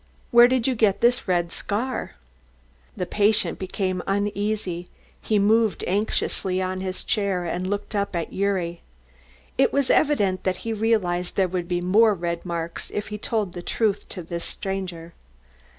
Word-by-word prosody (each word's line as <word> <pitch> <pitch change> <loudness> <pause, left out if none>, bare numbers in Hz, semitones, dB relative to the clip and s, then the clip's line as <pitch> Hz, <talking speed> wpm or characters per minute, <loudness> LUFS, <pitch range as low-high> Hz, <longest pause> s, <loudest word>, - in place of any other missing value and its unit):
"Where 240 0 +9
did 250 -2 +1
you 265 - +2
get 215 -4 +2
this 240 -1 +3
red 175 -2 +1
scar?" 225 - -3 0.8
The 180 - -1
patient 210 +4 +2
became 185 -1 -2
uneasy, 200 -3 -1 0.3
he 215 - +1
moved 215 +1 +3
anxiously 190 -1 0
on 185 0 -2
his 185 -1 -3
chair 195 -4 0
and 180 +2 -2
looked 205 +2 -3
up 200 -2 -1
at 170 -1 -2
Gyuri. 185 -4 -1 0.8
It 270 - +5
was 280 -2 +2
evident 205 -12 +2
that 185 -1 0
he 225 - -1
realised 200 -5 0
there 190 -2 +3
would 180 -1 -3
be 175 0 -1
more 210 +4 +4
red 170 -1 -3
marks 170 -1 -4
if 210 +1 -3
he 210 0 -5
told 210 -4 -1
the 175 - -6
truth 205 +2 -1
to 180 - -5
this 170 +1 -5
stranger. 180 -4 -5
195 Hz, 160 wpm, -24 LUFS, 180-215 Hz, 0.8 s, Where